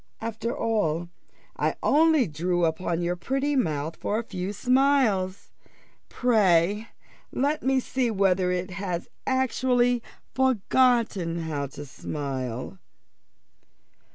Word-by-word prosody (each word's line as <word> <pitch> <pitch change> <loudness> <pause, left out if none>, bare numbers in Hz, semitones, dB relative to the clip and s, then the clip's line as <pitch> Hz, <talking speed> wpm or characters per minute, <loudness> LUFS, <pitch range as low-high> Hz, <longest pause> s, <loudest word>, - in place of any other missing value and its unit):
after 230 +1 -3
all, 175 -7 0 0.5
I - - 0
only 315 -3 +4
drew 175 +2 0
upon 170 +1 -1
your 175 +1 0
pretty 270 +10 -1
mouth 160 - -1
for 210 - -1
a 230 - -2
few 190 -3 -4
smiles. 250 -6 +1 0.6
Pray 210 -3 +2 0.4
let 290 +3 0
me 265 0 +2
see 255 -1 -1
whether 190 -3 +2
it 180 +1 -2
has 180 -2 -4 0.2
actually 250 -2 +2 0.3
forgotten 235 -8 +2
how 145 -3 -3
to 145 +2 -9
smile." 130 -7 -5
200 Hz, 105 wpm, -26 LUFS, 170-250 Hz, 0.6 s, only